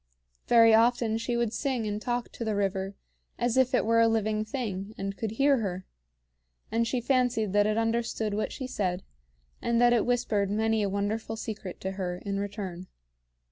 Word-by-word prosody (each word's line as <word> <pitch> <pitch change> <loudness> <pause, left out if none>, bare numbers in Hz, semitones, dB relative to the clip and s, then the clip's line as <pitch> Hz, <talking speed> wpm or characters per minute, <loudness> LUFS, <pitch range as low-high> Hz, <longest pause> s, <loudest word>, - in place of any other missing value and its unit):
Very 230 -1 +7
often 225 0 +3
she 235 +1 -1
would 235 -2 0
sing 255 -3 -1
and 210 0 -3
talk 240 0 -2
to - - -6
the 220 -2 -1
river 195 -1 -1 0.4
as 240 -1 0
if 260 -1 +3
it - - +2
were 230 +1 +3
a 230 - +6
living 215 -1 +1
thing, 215 -3 -4
and 195 0 -4
could 220 0 -3
hear 275 +3 +3
her; 190 -4 -3 0.9
and 230 0 +1
she 245 +2 0
fancied 245 -5 +1
that 205 0 +4
it 215 +1 0
understood 225 -2 0
what 215 - -1
she 265 - -5
said, 190 -7 -2 0.6
and 235 0 +1
that 240 0 +5
it 235 - +3
whispered 230 -5 +1
many 220 +1 +1
a 200 - 0
wonderful 210 +3 -2
secret 215 -4 -6
to 190 - -2
her 185 -2 -3
in 200 0 -2
return. 195 -3 -5
220 Hz, 185 wpm, -28 LUFS, 200-235 Hz, 0.9 s, Very